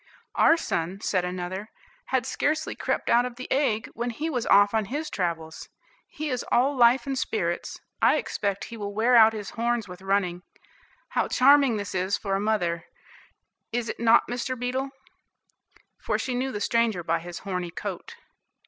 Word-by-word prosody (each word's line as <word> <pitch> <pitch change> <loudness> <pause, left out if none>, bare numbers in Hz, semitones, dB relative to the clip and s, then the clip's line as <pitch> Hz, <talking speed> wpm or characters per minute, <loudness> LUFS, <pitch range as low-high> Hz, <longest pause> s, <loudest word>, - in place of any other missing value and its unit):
"Our 325 - +5
son," 180 - -2
said 185 -4 0
another, 180 +3 -4 0.4
"had 260 -1 0
scarcely 310 +4 -1
crept - - -2
out 240 +1 +4
of 250 -1 -5
the 255 +1 -7
egg, 235 -6 +1
when 240 +2 -3
he 300 +8 -3
was 245 -5 -2
off 200 +1 +5
on 220 -2 +1
his 295 +8 -4
travels. 165 -3 -3 0.4
He 305 0 -5
is 250 - -2
all 265 +4 +3
life 240 0 +5
and 275 -1 -2
spirits, 175 -9 -2 0.2
I - - +5
expect 200 -2 -2
he - - -7
will 205 -1 -5
wear 235 +3 +3
out 220 -1 +7
his 210 -3 -6
horns 235 -1 -1
with 180 0 -10
running. 190 -2 0 0.7
How - - 0
charming 275 -3 +5
this 205 -1 -5
is 190 +1 0
for 195 -2 -3
a 195 - +1
mother, 175 -6 0 0.9
is 235 -1 -2
it - - -5
not 230 0 +5
Mr. 250 +1 -3
Beetle?" 255 +3 -2 1.1
for - - -1
she 255 - -3
knew 260 +2 -1
the 205 - -5
stranger 230 -7 +1
by 165 0 0
his 175 +1 -8
horny 180 -3 -3
coat. - - -6
225 Hz, 175 wpm, -26 LUFS, 190-250 Hz, 1.1 s, out